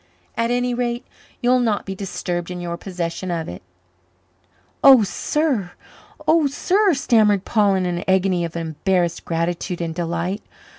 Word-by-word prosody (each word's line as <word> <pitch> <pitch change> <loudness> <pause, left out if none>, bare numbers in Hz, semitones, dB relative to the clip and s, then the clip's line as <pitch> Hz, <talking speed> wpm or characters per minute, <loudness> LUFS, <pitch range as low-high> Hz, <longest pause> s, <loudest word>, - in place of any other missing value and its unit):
At 230 0 0
any 245 0 0
rate, 240 +1 -2 0.4
you'll 250 +1 +4
not 225 -4 0
be 195 - -4
disturbed 180 -2 -4
in 180 0 -5
your 170 -1 -4
possession 175 0 -4
of 165 -2 -2
it." 90 - -8 1.2
"Oh, 265 -5 +9
sir! 220 - -1 0.5
oh, 315 -1 +4
sir!" 370 +6 +2
stammered 215 -7 +3
Paul 205 -3 +3
in 185 -1 0
an 175 -1 -2
agony 190 -2 +2
of 170 0 -5
embarrassed 170 +2 -1
gratitude 170 +1 -2
and 165 -1 -3
delight. 170 +3 -2
190 Hz, 145 wpm, -21 LUFS, 175-240 Hz, 1.2 s, Oh